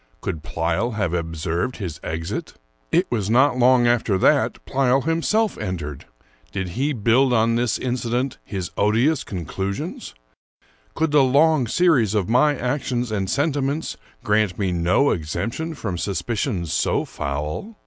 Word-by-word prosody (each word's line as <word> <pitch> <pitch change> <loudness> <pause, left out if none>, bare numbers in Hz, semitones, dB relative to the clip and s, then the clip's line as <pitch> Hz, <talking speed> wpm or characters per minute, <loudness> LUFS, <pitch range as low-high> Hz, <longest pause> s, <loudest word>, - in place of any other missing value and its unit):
Could 80 -4 -4
Pleyel 85 +10 -1
have 85 -6 -1
observed 85 +7 -2
his 90 -8 -5
exit? 80 +1 -4 0.4
It - - +3
was 105 -5 -1
not 130 +2 +4
long 125 0 +5
after 120 -4 +2
that - - +3
Pleyel 135 0 +2
himself 200 +7 +1
entered. 85 -9 -5 0.5
Did 95 -2 -3
he 135 +11 -1
build 125 +2 +3
on 115 0 +3
this 120 -1 +1
incident 125 +1 -2
his 95 -4 -5
odious 120 +9 +2
conclusions? 95 +2 -5 0.8
Could 160 -1 0
the 150 -1 +5
long 140 0 +3
series 130 - +3
of 100 -4 +1
my 130 +5 +3
actions 125 -2 -2
and 95 -3 -1
sentiments 145 +1 -1 0.3
grant 105 -5 +1
me 95 -3 0
no 90 +11 +2
exemption 100 - -3
from 95 -10 -4
suspicions 100 - -2
so - - +1
foul? 75 - -4
115 Hz, 140 wpm, -22 LUFS, 95-135 Hz, 0.8 s, long